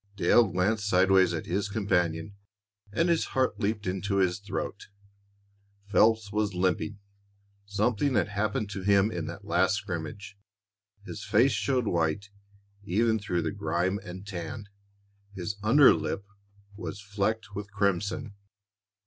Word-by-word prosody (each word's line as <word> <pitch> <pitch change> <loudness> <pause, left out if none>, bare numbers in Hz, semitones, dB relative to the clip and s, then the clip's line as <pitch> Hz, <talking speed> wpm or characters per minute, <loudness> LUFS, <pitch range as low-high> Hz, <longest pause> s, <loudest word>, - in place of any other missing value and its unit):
Dale 115 +3 +4
glanced 105 +4 0
sideways 95 -1 +4
at 80 -2 -3
his 100 +3 -1
companion, 90 -3 0 0.6
and 165 +12 +1
his 170 -2 +2
heart 130 -1 +1
leaped 105 +1 -1
into 95 +2 -2
his 95 -1 +2
throat. 100 0 -5 1.0
Phelps 110 0 +3
was 105 -2 -1
limping; 95 +3 0 0.7
something 110 +6 +1
had 105 -1 +2
happened 105 +2 -1
to 95 - -5
him 100 +2 +3
in 85 -4 -4
that 95 +4 -8
last 95 0 +2
scrimmage. 100 +1 -6 0.7
His 105 - -7
face 120 +6 +4
showed 120 +4 0
white 85 +2 -1 0.5
even 110 +4 +1
through 90 -4 -1
the - - -1
grime 85 +5 -1
and 95 +2 -8
tan; 100 +2 -6 0.7
his 95 +2 -4
under 130 +6 +7
lip 100 - -3 0.5
was 100 -1 -6
flecked 100 +1 -2
with 100 0 -6
crimson. 100 +3 -1
100 Hz, 130 wpm, -28 LUFS, 95-105 Hz, 1.0 s, under